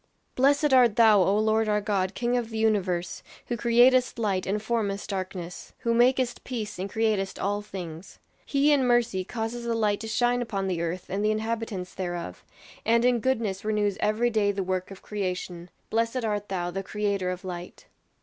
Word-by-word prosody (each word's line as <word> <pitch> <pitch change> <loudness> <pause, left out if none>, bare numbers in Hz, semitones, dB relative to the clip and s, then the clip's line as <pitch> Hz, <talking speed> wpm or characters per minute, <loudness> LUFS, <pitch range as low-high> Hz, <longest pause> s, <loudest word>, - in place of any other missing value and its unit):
"Blessed 285 +2 +3
art 245 -5 +6
thou, 220 -4 +6
O 195 +3 +3
Lord 220 0 +2
our 210 0 +2
God, 200 -2 -1
King 240 0 0
of 240 -2 -1
the 225 - -5
universe, 190 -5 0 0.3
who 240 - 0
createst 245 +2 +4
light 200 -5 -1
and 205 +2 0
formest 210 -3 -2
darkness; 185 -2 -5
who 235 -2 +1
makest 250 +1 +2
peace 225 -7 -5
and 195 +2 -3
createst 215 -4 0
all 205 +1 -1
things. 180 -4 -8 0.3
He 285 +1 +2
in 285 -3 +4
mercy 240 -6 +2
causes 225 +4 -4
the 235 -1 0
light 210 -2 +1
to 225 - -6
shine 245 +2 +1
upon 200 -5 -2
the 175 -3 -1
earth 170 +2 -3
and 200 +2 -2
the 210 - +3
inhabitants 215 -4 -3
thereof, 175 -2 -5 0.4
and 230 +1 +3
in 250 -1 +3
goodness 220 -6 -1
renews 210 -2 0
every 225 +3 +1
day 210 -2 +2
the 195 -1 -2
work 185 0 -2
of 195 -1 -11
creation. 180 -3 -4 0.2
Blessed 230 +2 0
art 205 -1 -2
thou, 175 -2 -2
the 195 +2 -3
Creator 200 -2 -1
of 180 0 -5
Light." 175 -1 -7
210 Hz, 185 wpm, -26 LUFS, 190-235 Hz, 0.4 s, art